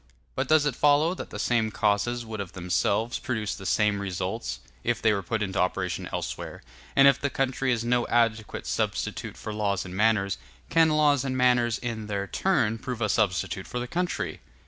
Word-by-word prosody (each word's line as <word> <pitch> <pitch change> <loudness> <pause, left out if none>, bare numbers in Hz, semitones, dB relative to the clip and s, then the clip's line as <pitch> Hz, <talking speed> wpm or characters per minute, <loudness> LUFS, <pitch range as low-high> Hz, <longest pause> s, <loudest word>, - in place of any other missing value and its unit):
But - - -2
does 155 -1 +4
it 140 -4 0
follow 150 +5 +4
that - - -7
the - - -7
same 115 -3 +1
causes 110 +3 0
would 110 -1 -6
of 100 -3 -5
themselves 100 +5 0
produce 110 -5 -2
the 95 -2 -7
same 105 -2 +2
results, 95 - -3 0.2
if - - 0
they 110 -1 +3
were 100 - -1
put 105 +4 -2
into 95 -1 -2
operation 90 - -1
elsewhere; - - -5 0.3
and 135 0 +7
if 140 0 +4
the 140 - 0
country 135 0 0
is 115 -1 0
no 120 0 +2
adequate 115 -2 0
substitute - - -2
for 110 - -6
laws 100 -3 -1
and 90 0 -7
manners, 105 -2 +2 0.3
can 165 -1 +5
laws 150 -3 +3
and 130 -1 -2
manners 125 -2 +3
in 115 -4 -4
their 100 -1 -2
turn 105 +4 +1
prove 125 -1 -5
a 110 -2 0
substitute 95 -7 0
for - - -5
the 120 - -4
country? 175 +6 -2
115 Hz, 190 wpm, -27 LUFS, 100-130 Hz, 0.3 s, and